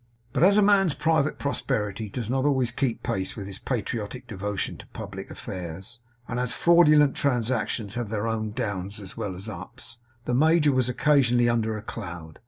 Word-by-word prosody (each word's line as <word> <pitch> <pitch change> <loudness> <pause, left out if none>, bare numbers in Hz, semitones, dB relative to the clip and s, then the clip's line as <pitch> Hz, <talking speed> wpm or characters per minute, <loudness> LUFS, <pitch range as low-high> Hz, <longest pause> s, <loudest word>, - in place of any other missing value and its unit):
But - - 0
as 200 +4 +6
a 210 - +6
man's 195 -6 +4
private 155 -2 +1
prosperity 110 -7 -2
does 115 +1 -4
not 130 +2 0
always 130 -4 +2
keep 125 -1 -1
pace 95 0 -2
with 100 - -6
his 100 -1 -7
patriotic 120 0 -3
devotion 105 -3 -3
to - - -12
public - - -8
affairs; 95 +6 -7 0.3
and 120 - -2
as 125 -1 -1
fraudulent 150 -4 +5
transactions 115 -5 0
have 120 -3 -3
their 105 0 -2 0.3
downs 100 -1 -3
as 95 -2 -9
well 95 -3 -4
as 95 +4 -7
ups, 115 +4 -8 0.3
the 125 - -1
major 155 +3 +4
was 130 -2 +1
occasionally 125 -3 +3
under 110 -2 +1
a 105 - -8
cloud. 85 -8 -7
120 Hz, 175 wpm, -26 LUFS, 105-140 Hz, 0.3 s, as